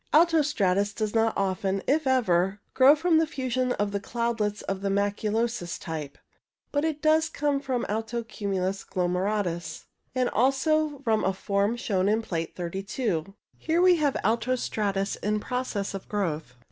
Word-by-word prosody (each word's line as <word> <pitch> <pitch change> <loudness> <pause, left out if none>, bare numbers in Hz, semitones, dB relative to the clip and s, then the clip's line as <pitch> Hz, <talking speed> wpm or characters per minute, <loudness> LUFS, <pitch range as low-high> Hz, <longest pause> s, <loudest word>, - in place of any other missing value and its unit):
Alto 330 +1 +5
stratus 205 -8 +1
does 215 -2 -2
not 225 0 +3
often, 195 0 -1
if 300 +1 +1
ever, 195 -6 +2
grow 270 +3 +7
from 320 +1 +3
the 320 - +2
fusion 255 -4 -1
of 205 0 -1
the 200 - -1
cloudlets 225 -1 -2
of 195 0 -3
the 200 - -1
maculosus 205 0 -1
type. 155 -4 -6 0.5
But 290 0 0
it 310 -2 -2
does 315 +1 +4
come 290 -2 0
from 260 -3 -2
alto 225 +2 -2
cumulus 195 -3 -2
glomeratus, 180 -2 -2 0.3
and 255 -1 +2
also 290 +3 +2
from 220 -3 +2
a 190 - +1
form 200 +3 0
shown 200 -5 0
in 220 +2 +1
Plate 165 -6 -4
32. 190 +1 -3 0.2
Here 325 +2 +1
we 360 -1 +6
have 290 -3 +1
alto 230 +4 +1
stratus 200 -4 -1
in 210 +1 -1
process 240 -5 -3
of 195 - -7
growth. 160 - -2
215 Hz, 160 wpm, -27 LUFS, 195-260 Hz, 0.5 s, grow